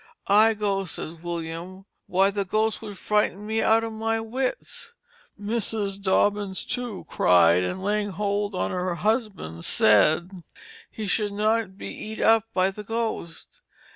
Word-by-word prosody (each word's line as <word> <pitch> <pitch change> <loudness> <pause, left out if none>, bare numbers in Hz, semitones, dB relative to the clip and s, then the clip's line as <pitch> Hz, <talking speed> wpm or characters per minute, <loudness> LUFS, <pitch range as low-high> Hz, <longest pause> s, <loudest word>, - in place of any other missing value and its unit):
I 215 +2 +5
go, 200 -2 -1
says 160 -2 -5
William, 170 +2 -6 0.2
why 195 +2 +3
the 200 0 -1
ghost 215 +3 0
would 205 -3 -8
frighten 210 -1 0
me 220 +1 0
out 225 +1 +4
of 225 -1 -4
my 225 +1 -1
wits. 260 - -4 0.4
Mrs. 205 -2 -1
Dobbins, 200 0 +1
too, 245 -5 -4
cried, 90 -1 +4
and 180 - -3
laying 205 +1 0
hold 205 +1 -2
on - - -1
her 180 -1 -2
husband 205 - -2
said 155 - +4 0.6
he 215 - -6
should 205 0 0
not 215 -1 0
be - - -7
eat 215 0 -7
up 225 -1 +4
by 185 +1 +2
the 210 +2 -9
ghost. 220 -7 -4
205 Hz, 145 wpm, -25 LUFS, 185-220 Hz, 0.6 s, I